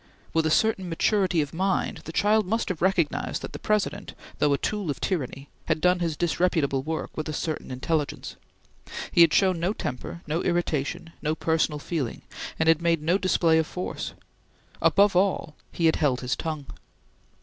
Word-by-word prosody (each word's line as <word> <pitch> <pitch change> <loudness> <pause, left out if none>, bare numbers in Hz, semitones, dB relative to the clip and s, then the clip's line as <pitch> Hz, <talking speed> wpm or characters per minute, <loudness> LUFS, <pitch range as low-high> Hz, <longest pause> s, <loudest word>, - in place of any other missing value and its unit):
With 160 -1 +2
a - - +2
certain 190 +1 +2
maturity 180 -1 +2
of 140 - -9
mind, 190 +3 0
the - - -6
child 210 +2 +2
must 225 +3 0
have 180 -4 -3
recognized 175 -4 0
that - - -6
the - - -6
President, 210 -1 -1 0.2
though 150 - +3
a 140 - +3
tool 205 -1 -2
of 145 - -2
tyranny, 140 -6 -3 0.2
had - - +1
done 180 +2 +3
his 165 -3 -1
disreputable 160 -5 +1
work 160 +3 -4
with 155 0 -3
a - - -3
certain 155 +1 -3
intelligence. 145 +4 -2 0.8
He - - +5
had 165 -2 +7
shown 185 -1 +3
no 180 +5 0
temper, 170 - -5
no 160 +3 -1
irritation, 165 -2 -1
no 155 +1 0
personal 160 -2 +1
feeling, 145 -4 -3 0.3
and 160 - +1
had 165 0 +5
made 165 -2 +1
no 175 +5 +2
display 165 -4 +3
of 160 - 0
force. 180 - -5 0.7
Above 200 -1 +4
all, 180 -4 +1 0.2
he 170 - -1
had 160 - +4
held 135 -5 +1
his 125 0 -1
tongue. 155 -3 -4
165 Hz, 180 wpm, -26 LUFS, 150-185 Hz, 0.8 s, had